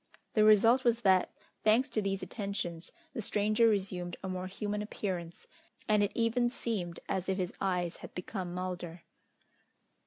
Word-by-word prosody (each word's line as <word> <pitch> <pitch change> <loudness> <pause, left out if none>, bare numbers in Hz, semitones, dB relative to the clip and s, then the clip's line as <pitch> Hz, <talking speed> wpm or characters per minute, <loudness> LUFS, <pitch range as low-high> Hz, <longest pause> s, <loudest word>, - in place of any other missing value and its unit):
The 215 - +4
result 225 +4 +6
was 235 -1 +2
that, 190 -3 +4 0.3
thanks 225 +5 +4
to 215 - 0
these 195 -1 -2
attentions, 185 -4 -4 0.2
the 240 - -3
stranger 215 +2 +3
resumed 185 -4 -1
a - - -3
more 185 0 -3
human 205 +2 -3
appearance, 180 -5 -4 0.4
and 210 -1 +4
it 205 - +2
even 235 +1 +2
seemed 200 -9 -3
as 190 -1 -2
if 190 - +1
his 185 -2 -2
eyes 180 -3 0
had - - -11
become 180 0 -4
milder. 175 -2 -5
195 Hz, 155 wpm, -32 LUFS, 180-215 Hz, 0.4 s, result